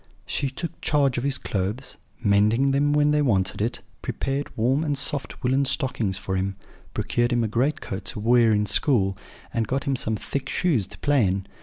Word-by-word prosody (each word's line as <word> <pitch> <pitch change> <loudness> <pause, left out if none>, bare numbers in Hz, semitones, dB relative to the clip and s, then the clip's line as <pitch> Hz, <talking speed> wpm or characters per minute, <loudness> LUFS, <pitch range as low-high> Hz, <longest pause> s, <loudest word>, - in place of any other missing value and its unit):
She 140 - -1
took 165 +6 -6
charge 140 -5 +2
of - - -5
his 140 -1 0
clothes, 105 +7 -3 0.3
mending 105 +6 +3
them 145 +2 +2
when 150 0 +3
they 150 0 +3
wanted 100 -7 +1
it; 115 +3 -1 0.2
prepared 135 +1 -2
warm 130 +7 +2
and 145 -3 -1
soft 140 0 0
woollen 130 +2 +2
stockings 125 -9 -1
for 95 -1 -3
him, 95 +1 -1 0.4
procured 120 +1 0
him 120 -1 +2
a - - +1
great 125 +8 0
coat 95 +1 -5
to - - -5
wear 115 +1 +4
in 105 -1 +2
school, 100 -2 +2 0.4
and 115 -1 0
got 135 +1 -1
him 140 -2 0
some 110 -3 -1
thick 135 +6 -4
shoes 140 - +1
to - - -13
play 140 -8 +3
in. 95 +1 -1
125 Hz, 195 wpm, -25 LUFS, 105-140 Hz, 0.4 s, wear